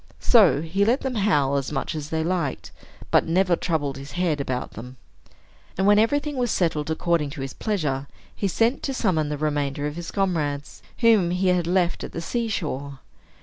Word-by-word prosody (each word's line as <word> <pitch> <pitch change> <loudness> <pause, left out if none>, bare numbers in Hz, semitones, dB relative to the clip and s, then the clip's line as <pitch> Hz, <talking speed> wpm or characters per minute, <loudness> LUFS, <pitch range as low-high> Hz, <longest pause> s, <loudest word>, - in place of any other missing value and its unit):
So 175 - +5
he 185 +5 0
let 235 +6 +2
them 265 -1 -2
howl 150 - +2
as 135 0 -3
much 145 - -2
as 155 -1 -5
they 160 -1 -1
liked, 170 -5 -2 0.4
but - - +4
never 180 +1 +3
troubled 150 -6 -2
his 140 +1 -9
head 175 -5 0
about 130 -2 -3
them. 125 +4 -10 0.8
And, 190 - +1
when 205 +1 +6
everything 285 +5 +1
was 245 -1 0
settled 160 -6 0
according 160 -2 0
to - - -5
his 135 -1 -5
pleasure, 150 -10 -2 0.3
he 200 - -1
sent 230 +7 +1
to 270 - -3
summon 160 -11 +1
the 150 - -2
remainder 145 -1 -1
of 150 +2 -4
his 170 -1 -6
comrades, 155 -8 -2 0.2
whom 220 -7 +5
he 180 +1 +1
had 180 -2 +1
left 180 -1 +1
at - - -7
the - - -4
sea 235 +7 -2
shore. 140 -9 -4
170 Hz, 190 wpm, -24 LUFS, 145-195 Hz, 0.8 s, when